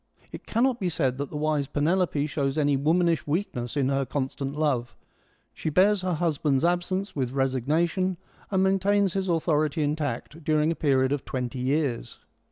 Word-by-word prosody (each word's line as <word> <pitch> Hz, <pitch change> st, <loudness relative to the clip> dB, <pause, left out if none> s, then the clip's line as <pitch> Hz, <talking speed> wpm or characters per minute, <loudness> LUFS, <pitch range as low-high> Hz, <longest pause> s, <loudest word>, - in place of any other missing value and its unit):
It -, -, -10 dB
cannot 245 Hz, +2 st, +1 dB
be 185 Hz, -, 0 dB
said 135 Hz, -5 st, -1 dB
that 140 Hz, -, -3 dB
the 150 Hz, -, -5 dB
v/ise 150 Hz, -2 st, 0 dB
Penelope 155 Hz, 0 st, +1 dB
shows 140 Hz, -1 st, -2 dB
any 145 Hz, -2 st, +2 dB
womanish 165 Hz, +4 st, +1 dB
weakness 145 Hz, -, -2 dB
in 135 Hz, -2 st, +2 dB
her 135 Hz, 0 st, +1 dB
constant 135 Hz, +1 st, -3 dB
love: 130 Hz, -6 st, 0 dB, 0.6 s
she -, -, -3 dB
bears 190 Hz, +5 st, +3 dB
her 185 Hz, -2 st, -1 dB
husband's 150 Hz, -3 st, +1 dB
absence 180 Hz, +3 st, -1 dB
with 130 Hz, -3 st, -2 dB
resignation, 155 Hz, +8 st, 0 dB, 0.3 s
and 190 Hz, -1 st, +2 dB
maintains 195 Hz, 0 st, +2 dB
his 190 Hz, -1 st, -1 dB
authority 155 Hz, -2 st, +1 dB
intact 150 Hz, +1 st, -3 dB
during 155 Hz, +1 st, +2 dB
a -, -, -2 dB
period 135 Hz, -4 st, +2 dB
of 145 Hz, -1 st, -1 dB
twenty 125 Hz, 0 st, -4 dB
years. 135 Hz, -1 st, -1 dB
150 Hz, 165 wpm, -26 LUFS, 135-175 Hz, 0.6 s, bears